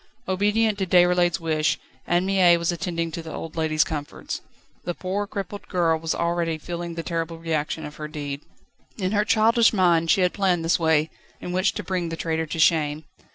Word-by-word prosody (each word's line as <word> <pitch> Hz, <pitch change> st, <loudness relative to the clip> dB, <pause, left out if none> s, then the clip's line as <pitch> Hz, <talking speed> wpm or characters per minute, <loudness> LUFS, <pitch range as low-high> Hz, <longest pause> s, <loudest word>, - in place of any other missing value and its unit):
Obedient 205 Hz, +3 st, +1 dB
to 190 Hz, -, -1 dB
Déroulède's 175 Hz, -1 st, +4 dB
wish, 155 Hz, -2 st, 0 dB, 0.3 s
Anne 175 Hz, +1 st, +2 dB
Mie 185 Hz, -3 st, +5 dB
was 170 Hz, +1 st, 0 dB
attending 170 Hz, -1 st, -3 dB
to 165 Hz, -, -5 dB
the 160 Hz, -1 st, -8 dB
old 160 Hz, -, -7 dB
lady's 160 Hz, -1 st, +2 dB
comforts. 145 Hz, -2 st, -5 dB, 0.4 s
The 175 Hz, -, -3 dB
poor, 195 Hz, +2 st, -3 dB
crippled 200 Hz, 0 st, -6 dB
girl 165 Hz, -3 st, +1 dB
was 165 Hz, 0 st, -2 dB
already 170 Hz, -1 st, 0 dB
feeling 170 Hz, +1 st, -5 dB
the 165 Hz, -, -4 dB
terrible 165 Hz, -1 st, -3 dB
reaction 160 Hz, -1 st, -2 dB
of 150 Hz, 0 st, -9 dB
her 150 Hz, -, -5 dB
deed. 145 Hz, -2 st, -5 dB, 0.6 s
In 185 Hz, -3 st, -1 dB
her 210 Hz, -1 st, +2 dB
childish 225 Hz, +2 st, +4 dB
mind 170 Hz, -4 st, +3 dB
she 195 Hz, -, +4 dB
had 180 Hz, -1 st, +2 dB
planned 180 Hz, -4 st, +1 dB
this 165 Hz, -, +2 dB
way, 160 Hz, -1 st, +2 dB, 0.3 s
in 180 Hz, -, -6 dB
which 185 Hz, +2 st, +1 dB
to -, -, -5 dB
bring 180 Hz, -3 st, -2 dB
the 165 Hz, -, -4 dB
traitor 160 Hz, -1 st, -1 dB
to 160 Hz, -, -5 dB
shame. 155 Hz, -2 st, +2 dB
170 Hz, 195 wpm, -24 LUFS, 160-185 Hz, 0.6 s, Mie